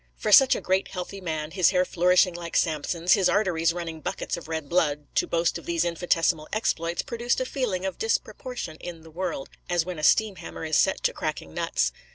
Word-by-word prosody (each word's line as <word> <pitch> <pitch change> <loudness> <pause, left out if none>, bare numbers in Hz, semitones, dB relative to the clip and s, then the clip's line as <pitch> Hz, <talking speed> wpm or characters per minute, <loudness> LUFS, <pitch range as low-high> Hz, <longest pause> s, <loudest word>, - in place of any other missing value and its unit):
For 215 - -2
such 265 +5 +8
a - - -4
great, 190 +1 +1
healthy 195 +2 -6
man, 155 -3 -3
his 185 0 +4
hair 185 -1 +2
flourishing 180 +1 +3
like 170 -1 -3
Samson's, 165 +3 +1
his 195 -3 +3
arteries 175 -5 +2
running 165 -2 -6
buckets - - -3
of 170 - -9
red 160 -2 -4
blood, 150 -3 +1
to - - +1
boast 170 0 0
of - - -15
these 170 0 +1
infinitesimal 165 -2 +1
exploits, 170 -6 -1
produced 235 0 -1
a 255 - -1
feeling 225 -9 -2
of 190 - -4
disproportion 255 - -3
in 165 -2 -8
the 160 - -14
world, 170 -4 -4 0.2
as 175 -2 +1
when 180 -3 -5
a - - -7
steam 215 +3 +3
hammer - - -7
is 155 -1 +2
set 190 - +1
to - - +2
cracking 150 - -4
nuts. - - 0
175 Hz, 210 wpm, -26 LUFS, 160-190 Hz, 0.2 s, such